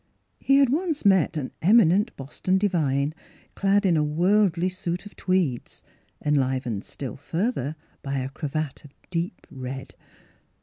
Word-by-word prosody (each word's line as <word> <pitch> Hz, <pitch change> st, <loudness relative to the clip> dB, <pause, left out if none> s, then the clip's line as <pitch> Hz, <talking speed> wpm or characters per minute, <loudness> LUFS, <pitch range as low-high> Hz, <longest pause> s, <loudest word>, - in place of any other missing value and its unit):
He 275 Hz, -, +3 dB
had 275 Hz, -2 st, +5 dB
once 310 Hz, -, -1 dB
met 190 Hz, -5 st, +4 dB
an 135 Hz, -4 st, -3 dB
eminent 205 Hz, +2 st, +4 dB
Boston 145 Hz, +7 st, -1 dB
divine 155 Hz, -7 st, +1 dB, 0.4 s
clad 200 Hz, +1 st, +2 dB
in 180 Hz, -3 st, +4 dB
a 155 Hz, -, +3 dB
worldly 180 Hz, +3 st, +2 dB
suit 180 Hz, 0 st, -3 dB
of 205 Hz, -, -12 dB
tweeds, 180 Hz, -10 st, -1 dB, 0.4 s
enlivened 130 Hz, -7 st, 0 dB
still 135 Hz, -3 st, -6 dB
further 160 Hz, -, -2 dB, 0.3 s
by 140 Hz, 0 st, -3 dB
a 130 Hz, 0 st, -2 dB
cravat 150 Hz, 0 st, -4 dB
of 145 Hz, -2 st, -16 dB, 0.2 s
deep 175 Hz, +1 st, -3 dB
red. 130 Hz, 0 st, -7 dB
165 Hz, 135 wpm, -25 LUFS, 140-195 Hz, 0.4 s, had